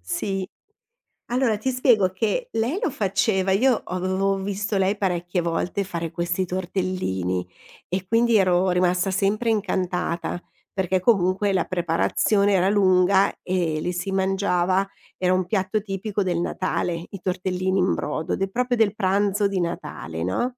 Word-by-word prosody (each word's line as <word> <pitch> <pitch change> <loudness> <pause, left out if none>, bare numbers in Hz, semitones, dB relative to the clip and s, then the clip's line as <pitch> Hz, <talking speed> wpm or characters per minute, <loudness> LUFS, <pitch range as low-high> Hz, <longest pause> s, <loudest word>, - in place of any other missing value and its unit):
sì. 195 - -3 0.8
Allora 245 -4 +2
ti 260 +5 -1
spiego 240 -7 +3
che 225 - -1
lei 245 - 0
lo 300 - 0
faceva 195 -4 +1
io 250 +3 +3
avevo 185 +2 0
visto 200 +1 -2
lei 195 +2 +2
parecchie 175 -2 -1
volte 170 +4 -1
fare 170 -3 -4
questi 175 +2 -1
tortellini, 175 - -2 0.4
e 185 +1 -2
quindi 230 +1 +3
ero 185 -1 +3
rimasta 180 +1 +2
sempre 205 +5 +1
incantata, 180 -5 -1 0.3
perché 185 -1 0
comunque 195 -1 +2
la 185 - +1
preparazione 185 +4 +1
era 190 0 +3
lunga 190 -1 +4
e 175 -4 -1
li 180 - -1
si 175 +3 -3
mangiava 190 -1 +1 0.3
era 185 0 +2
un 185 -1 +1
piatto 205 +1 0
tipico 200 +1 -3
del 175 -2 -1
Natale, 175 -1 -2
i 195 - -8
tortellini 185 +1 -1
in 185 - +2
brodo, 155 +1 -3
ed 195 - -1
è - - 0
proprio 245 +2 0
del 215 -2 +3
pranzo 200 +1 +1
di 195 -2 -2
Natale, 85 - -4
no, 245 - -1
190 Hz, 150 wpm, -23 LUFS, 180-205 Hz, 0.8 s, lunga